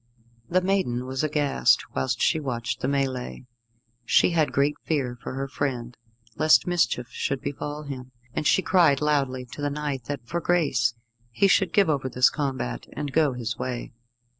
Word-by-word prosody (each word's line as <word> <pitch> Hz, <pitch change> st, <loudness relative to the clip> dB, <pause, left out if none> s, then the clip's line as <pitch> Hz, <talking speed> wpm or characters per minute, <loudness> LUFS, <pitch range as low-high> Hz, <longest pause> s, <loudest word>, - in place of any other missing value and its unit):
The 185 Hz, +1 st, +3 dB
maiden 180 Hz, -11 st, 0 dB
was 130 Hz, +2 st, -3 dB
aghast 145 Hz, -, +2 dB
whilst 65 Hz, 0 st, -1 dB
she 160 Hz, -, +2 dB
watched 120 Hz, -5 st, -3 dB
the -, -, -1 dB
melée. 135 Hz, -2 st, -2 dB, 0.6 s
She 120 Hz, -, +4 dB
had 160 Hz, -3 st, +2 dB
great 140 Hz, +2 st, +2 dB
fear 135 Hz, -6 st, -1 dB
for 120 Hz, -, -6 dB
her 135 Hz, +1 st, -3 dB
friend, 125 Hz, -4 st, -3 dB, 0.4 s
lest 155 Hz, +5 st, +5 dB
mischief 170 Hz, -9 st, 0 dB
should 135 Hz, -, -2 dB
befall 145 Hz, +2 st, -5 dB
him, 130 Hz, -3 st, -7 dB, 0.2 s
and 150 Hz, -, -1 dB
she 190 Hz, -, +3 dB
cried 165 Hz, -7 st, +4 dB
loudly 140 Hz, -4 st, 0 dB
to 145 Hz, -, -8 dB
the 145 Hz, -, 0 dB
knight 145 Hz, -4 st, -3 dB
that, 140 Hz, -3 st, -5 dB
for 170 Hz, +6 st, -2 dB
grace, 135 Hz, -10 st, +1 dB, 0.3 s
he 120 Hz, -, +3 dB
should 195 Hz, -2 st, +3 dB
give 200 Hz, +1 st, +4 dB
over 140 Hz, -4 st, 0 dB
this 125 Hz, 0 st, +4 dB
combat, 130 Hz, -, -3 dB
and 145 Hz, -2 st, -4 dB
go 155 Hz, -4 st, +3 dB
his 120 Hz, -1 st, -4 dB
way. 125 Hz, -2 st, -4 dB
140 Hz, 170 wpm, -25 LUFS, 125-150 Hz, 0.6 s, lest